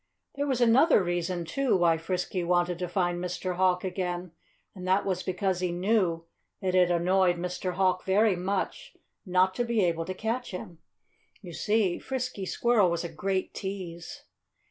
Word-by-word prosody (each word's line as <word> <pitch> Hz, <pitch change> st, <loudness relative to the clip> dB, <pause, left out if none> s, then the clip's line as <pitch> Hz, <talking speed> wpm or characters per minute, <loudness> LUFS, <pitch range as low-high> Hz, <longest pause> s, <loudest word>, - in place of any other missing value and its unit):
There 285 Hz, +1 st, -2 dB
was 260 Hz, -3 st, 0 dB
another 240 Hz, -, +5 dB
reason, 175 Hz, 0 st, -2 dB
too, 260 Hz, +5 st, +1 dB
why 170 Hz, -2 st, +3 dB
Frisky 180 Hz, +2 st, -2 dB
wanted 175 Hz, 0 st, +1 dB
to 180 Hz, -, -2 dB
find 175 Hz, -1 st, -1 dB
Mr. 180 Hz, 0 st, -3 dB
Hawk 180 Hz, -1 st, +2 dB
again 180 Hz, -1 st, -3 dB, 0.4 s
and 185 Hz, -1 st, -8 dB
that 190 Hz, +2 st, +2 dB
was 185 Hz, -2 st, -1 dB
because 185 Hz, 0 st, -1 dB
he 180 Hz, -1 st, -1 dB
knew 175 Hz, -2 st, +1 dB, 0.3 s
that 185 Hz, -2 st, -1 dB
it 180 Hz, -1 st, +4 dB
annoyed 180 Hz, +1 st, +3 dB
Mr. 180 Hz, +1 st, -3 dB
Hawk 185 Hz, 0 st, +1 dB
very 205 Hz, +1 st, +3 dB
much 190 Hz, +2 st, -3 dB, 0.3 s
not 185 Hz, +1 st, +3 dB
to 240 Hz, -, -1 dB
be 235 Hz, -3 st, +1 dB
able 165 Hz, -1 st, -1 dB
to 185 Hz, -, -5 dB
catch 230 Hz, +5 st, -3 dB
him. 180 Hz, -3 st, -8 dB, 0.6 s
You 175 Hz, -2 st, -9 dB
see, 205 Hz, -1 st, +1 dB
Frisky 255 Hz, -7 st, -4 dB
Squirrel 230 Hz, -5 st, +3 dB
was 170 Hz, 0 st, -1 dB
a 170 Hz, -, -4 dB
great 190 Hz, +1 st, -2 dB
tease. 185 Hz, -4 st, -6 dB
185 Hz, 165 wpm, -28 LUFS, 175-195 Hz, 0.6 s, another